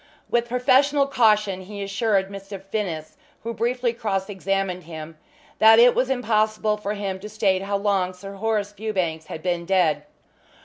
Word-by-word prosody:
With 240 0 +2
professional 270 +3 +3
caution 210 -7 +2
he 200 +2 -7
assured 200 -1 0
Mr. 195 0 -8
Finnis, 190 -6 -4 0.3
who 230 +1 -3
briefly 240 +1 0
cross 200 -4 -2
examined 195 -2 -2
him, 160 -1 -8 0.4
that 220 +1 +8
it 240 +1 +7
was 260 +1 0
impossible 215 -4 +1
for 210 0 -3
him 195 -2 -4
to 210 +2 -8
state 200 -3 +1
how 200 +1 -1
long 195 -2 0
Sir 195 +2 -9
Horace 205 0 -1
Fewbanks 185 -7 -3
had 155 - -7
been 175 -1 -1
dead. 175 -4 +2
200 Hz, 160 wpm, -23 LUFS, 190-225 Hz, 0.4 s, that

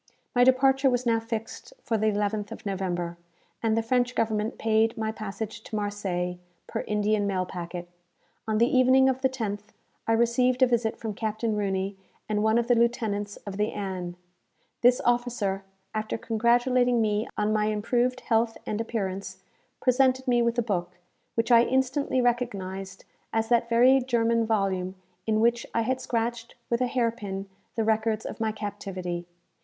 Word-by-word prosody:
My 245 -1 +5
departure 265 +1 +4
was 250 0 0
now 230 -1 +3
fixed 225 - -6
for 230 - -1
the 220 0 +1
11th 205 0 -1
of - - -9
November, 175 -3 -2 0.4
and 225 -1 +1
the 225 - +1
French 245 +1 +1
government 220 0 0
paid 225 0 +2
my 220 0 -1
passage 220 +1 -6
to 220 - -7
Marseilles, 190 -4 -2 0.3
per - - -4
Indian 210 0 +1
mail 185 -2 0
packet. 175 -1 -6 0.6
On 215 -1 +1
the 230 - +5
evening 260 +1 +5
of 260 0 -1
the 265 - +3
10th, 215 -6 -3 0.5
I 225 - +3
received 245 +2 +3
a - - +9
visit 235 -3 0
from 220 -2 -4
Captain 220 +1 -2
Rooney 195 -1 -1 0.3
and 210 -1 0
one 220 +1 +3
of 235 0 +1
the 245 - +5
lieutenants 220 -4 0
of 200 -1 -6
the 210 +1 0
"Ann." 185 -3 -4 0.7
This 245 +1 +5
officer, 240 -5 0 0.3
after 215 0 -2
congratulating 240 +2 +2
me 215 0 +1
on 210 +1 +1
my 210 -1 +2
improved 240 +4 0
health 225 -1 +1
and 215 +1 -2
appearance, 195 -4 -4 0.4
presented 260 +1 +3
me 240 -1 +4
with 235 0 +1
a 240 - +2
book, 180 -5 -2 0.4
which 230 +2 0
I 235 -1 +8
instantly 260 +1 +1
recognized 195 -6 -2 0.3
as 225 0 0
that 235 -1 +3
very 250 +3 +6
German 230 -2 +1
volume 190 -4 0 0.3
in 215 -1 +2
which 235 +1 +2
I 230 - +3
had 260 +3 -1
scratched, 235 -1 -2 0.2
with 235 +1 +1
a 250 - +3
hair 240 -2 +1
pin, 200 -4 -6 0.3
the 225 - +1
records 220 0 +1
of - - -6
my 220 -1 +1
captivity. 195 -5 -5
225 Hz, 170 wpm, -27 LUFS, 205-240 Hz, 0.7 s, a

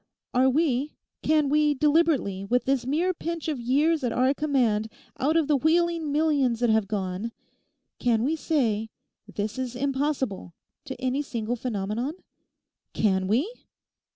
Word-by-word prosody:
Are 255 +1 +4
we—can 300 +1 0
we, 300 +1 +3
deliberately, 290 - +2
with 240 +4 0
this 265 -2 0
mere 335 +7 +1
pinch 335 -1 -5
of 300 -5 -2
years 290 +6 +2
at 245 - 0
our 255 +3 +2
command 245 -8 +1 0.3
out 305 +5 +2
of 320 -3 +2
the 300 - +3
wheeling 325 +1 +1
millions 285 -6 +2
that 240 -2 +3
have 220 -2 +2
gone—can 220 +3 -4
we 300 +5 +1
say, 230 -10 0 0.4
"This 210 +4 -4
is 255 -1 -3
impossible," 265 - -2 0.3
to 265 -3 -7
any 260 +2 0
single 235 -4 -3
phenomenon? 230 - -3 0.8
Can 190 -3 +1
we? 270 - +1
265 Hz, 135 wpm, -26 LUFS, 225-300 Hz, 0.8 s, Are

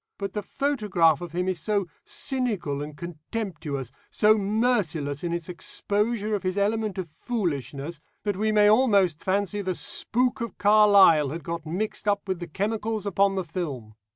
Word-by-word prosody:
But 200 -1 -4
the 210 - -2
photograph 200 - +1
of 175 -2 -7
him 180 +1 -1
is 185 -2 -1
so 200 +1 0 0.2
cynical 210 - -2
and 150 0 -7
contemptuous, 155 - -5 0.2
so 215 +1 +4
merciless 195 - 0
in 170 - -1
its 170 -2 -3
exposure 210 +4 -1
of 205 - 0
his 185 0 -2
element 210 0 0
of 185 -2 -3
foolishness, 155 - -3 0.2
that 205 -2 -1
we 215 +3 0
may 210 -1 +5
almost 205 - +4
fancy 200 +2 0
the 185 -2 -2
spook 250 +7 0
of 235 -4 -5
Carlyle 200 -8 +6
had 160 +3 -6
got 165 0 -5
mixed 210 +6 -3
up 205 0 +1
with 190 -2 -2
the 175 - -6
chemicals 215 +4 -2
upon 200 0 +2
the 190 -2 -2
film. 135 - -5
195 Hz, 165 wpm, -26 LUFS, 165-210 Hz, 0.2 s, Carlyle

